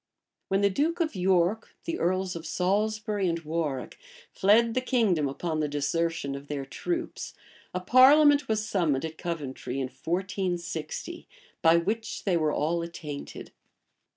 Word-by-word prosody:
When 195 Hz, +1 st, +1 dB
the 200 Hz, -, +4 dB
duke 320 Hz, -, 0 dB
of 320 Hz, -8 st, 0 dB
York, 185 Hz, +3 st, +1 dB
the 335 Hz, 0 st, -3 dB
earls 185 Hz, +1 st, 0 dB
of 165 Hz, -1 st, -6 dB
Salisbury 205 Hz, +3 st, 0 dB
and 165 Hz, -, 0 dB
Warwick, 155 Hz, -4 st, -3 dB, 0.3 s
fled 225 Hz, +4 st, +4 dB
the 255 Hz, -, +1 dB
kingdom 210 Hz, -, +2 dB
upon 155 Hz, +3 st, -3 dB
the 150 Hz, -, +1 dB
desertion 145 Hz, 0 st, -1 dB
of 140 Hz, +1 st, -8 dB
their 140 Hz, -2 st, -4 dB
troops, 335 Hz, -, -4 dB, 0.4 s
a 180 Hz, -, -2 dB
parliament 285 Hz, +6 st, +6 dB
was 220 Hz, 0 st, 0 dB
summoned 160 Hz, -8 st, +1 dB
at 160 Hz, 0 st, -7 dB
Coventry 145 Hz, -7 st, -4 dB
in 135 Hz, -1 st, -2 dB
1460, 185 Hz, -, -3 dB, 0.3 s
by 165 Hz, 0 st, +6 dB
which 215 Hz, +7 st, -2 dB
they 190 Hz, -4 st, +1 dB
were 155 Hz, -2 st, +2 dB
all 165 Hz, +4 st, 0 dB
attainted. 165 Hz, -4 st, -7 dB
180 Hz, 145 wpm, -27 LUFS, 160-215 Hz, 0.4 s, parliament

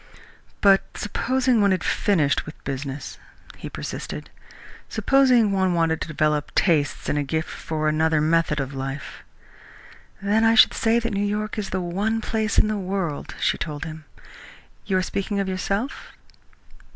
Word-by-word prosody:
"But 195 Hz, -1 st, +6 dB, 0.2 s
supposing 255 Hz, +2 st, +1 dB
one 200 Hz, -, +4 dB
had 185 Hz, -1 st, +1 dB
finished 155 Hz, -10 st, +1 dB
with 155 Hz, -, -11 dB
business?" 135 Hz, +1 st, -5 dB, 0.4 s
he -, -, -7 dB
persisted. -, -, -6 dB, 0.6 s
"Supposing 255 Hz, -6 st, +4 dB
one 190 Hz, -2 st, +1 dB
wanted 165 Hz, -1 st, +1 dB
to -, -, -3 dB
develop 150 Hz, -1 st, 0 dB
tastes 155 Hz, -6 st, +1 dB
and 145 Hz, -, +1 dB
a -, -, 0 dB
gift 160 Hz, +3 st, -2 dB
for 155 Hz, -1 st, -3 dB
another 155 Hz, 0 st, +2 dB
method 155 Hz, -1 st, +2 dB
of 135 Hz, 0 st, -3 dB
life?" 135 Hz, +1 st, -6 dB, 1.0 s
"Then 205 Hz, +3 st, +2 dB
I 225 Hz, 0 st, +5 dB
should 220 Hz, -, +7 dB
say 225 Hz, +1 st, +2 dB
that 230 Hz, -2 st, -1 dB
New 200 Hz, -, 0 dB
York 210 Hz, +2 st, -2 dB
is 205 Hz, -, -3 dB
the 190 Hz, -, -2 dB
one 200 Hz, +6 st, -1 dB
place 220 Hz, -1 st, -1 dB
in -, -, +5 dB
the 215 Hz, -1 st, -1 dB
world," 185 Hz, -5 st, -3 dB
she -, -, +1 dB
told 150 Hz, -2 st, -4 dB
him. 160 Hz, -1 st, -8 dB, 0.8 s
"You 190 Hz, -, +2 dB
are 185 Hz, -, +1 dB
speaking 200 Hz, +2 st, -2 dB
of 195 Hz, -, -1 dB
yourself?" 195 Hz, +6 st, -3 dB
185 Hz, 160 wpm, -23 LUFS, 155-210 Hz, 1.0 s, should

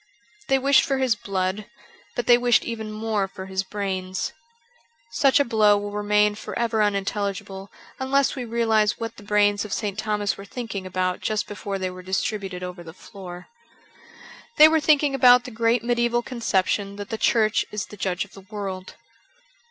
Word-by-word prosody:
They 270 Hz, -, +3 dB
wished 275 Hz, +1 st, +5 dB
for 270 Hz, -, -1 dB
his 260 Hz, -3 st, +2 dB
blood, 195 Hz, -2 st, -3 dB, 0.5 s
but 245 Hz, -, -2 dB
they 240 Hz, -, +7 dB
wished 245 Hz, -1 st, +3 dB
even 220 Hz, -2 st, -5 dB
more 215 Hz, -2 st, -1 dB
for 190 Hz, 0 st, -9 dB
his 190 Hz, 0 st, -2 dB
brains. 190 Hz, -2 st, -3 dB, 0.8 s
Such 275 Hz, -9 st, +3 dB
a 285 Hz, -, +3 dB
blow 215 Hz, -3 st, +4 dB
will 205 Hz, 0 st, -4 dB
remain 210 Hz, 0 st, +2 dB
for 210 Hz, -, -7 dB
ever 230 Hz, -2 st, +1 dB
unintelligible 200 Hz, -1 st, -2 dB, 0.3 s
unless 270 Hz, +1 st, +1 dB
we 255 Hz, -, -4 dB
realize 225 Hz, -2 st, +1 dB
what 230 Hz, 0 st, -5 dB
the -, -, -11 dB
brains 205 Hz, 0 st, +2 dB
of 210 Hz, -, -8 dB
St. 210 Hz, -2 st, -3 dB
Thomas 210 Hz, -2 st, -1 dB
were 200 Hz, -, -9 dB
thinking 205 Hz, -4 st, -6 dB
about 185 Hz, 0 st, -1 dB
just 215 Hz, -1 st, -1 dB
before 200 Hz, -1 st, -5 dB
they 185 Hz, -1 st, -3 dB
were 185 Hz, 0 st, -10 dB
distributed 190 Hz, 0 st, -3 dB
over 180 Hz, -1 st, -7 dB
the 160 Hz, -1 st, -11 dB
floor. 180 Hz, -3 st, -10 dB, 1.1 s
They 305 Hz, -, +10 dB
were 320 Hz, 0 st, +3 dB
thinking 295 Hz, -2 st, +3 dB
about 250 Hz, -2 st, +6 dB
the 250 Hz, -, -8 dB
great 230 Hz, +1 st, +1 dB
medieval 240 Hz, 0 st, +1 dB
conception 200 Hz, -4 st, -1 dB
that 205 Hz, 0 st, -7 dB
the 225 Hz, -, -3 dB
Church 215 Hz, -2 st, +2 dB
is 210 Hz, -2 st, -3 dB
the -, -, -12 dB
judge 185 Hz, -2 st, -2 dB
of 200 Hz, -, -22 dB
the 195 Hz, -, -12 dB
world. 190 Hz, -2 st, -6 dB
210 Hz, 175 wpm, -24 LUFS, 195-235 Hz, 1.1 s, They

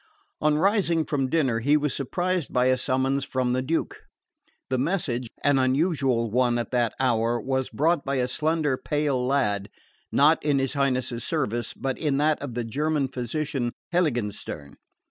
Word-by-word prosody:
On 150 Hz, 0 st, +3 dB
rising 170 Hz, -3 st, +2 dB
from 135 Hz, -3 st, -1 dB
dinner 135 Hz, -8 st, +1 dB
he 145 Hz, +6 st, +3 dB
was 150 Hz, -2 st, -1 dB
surprised 175 Hz, +4 st, -1 dB
by 125 Hz, 0 st, +2 dB
a 130 Hz, 0 st, +3 dB
summons 135 Hz, +1 st, 0 dB
from 130 Hz, -2 st, -1 dB
the 130 Hz, +1 st, +1 dB
Duke. 165 Hz, -, -2 dB, 0.7 s
The 130 Hz, -, +1 dB
message, 130 Hz, -6 st, -1 dB, 0.2 s
an 145 Hz, -1 st, +4 dB
unusual 130 Hz, -, +1 dB
one 120 Hz, 0 st, +2 dB
at 120 Hz, -, -3 dB
that 120 Hz, -3 st, +1 dB
hour, 120 Hz, -2 st, +1 dB
was 130 Hz, +2 st, -1 dB
brought 160 Hz, +1 st, +1 dB
by 140 Hz, 0 st, -2 dB
a 125 Hz, -1 st, +1 dB
slender 150 Hz, 0 st, 0 dB
pale 145 Hz, -4 st, -1 dB
lad, 105 Hz, -7 st, 0 dB, 0.4 s
not 150 Hz, +3 st, +4 dB
in 145 Hz, -2 st, +2 dB
his 135 Hz, -1 st, 0 dB
Highness's 130 Hz, -4 st, 0 dB
service, 120 Hz, -8 st, -2 dB
but 135 Hz, -1 st, -3 dB
in 145 Hz, -4 st, 0 dB
that 150 Hz, +1 st, +2 dB
of 135 Hz, -5 st, -6 dB
the 120 Hz, -, -1 dB
German 145 Hz, +4 st, -1 dB
physician 130 Hz, 0 st, -3 dB, 0.2 s
Heiligenstern. 110 Hz, -, -2 dB
135 Hz, 165 wpm, -25 LUFS, 125-150 Hz, 0.7 s, an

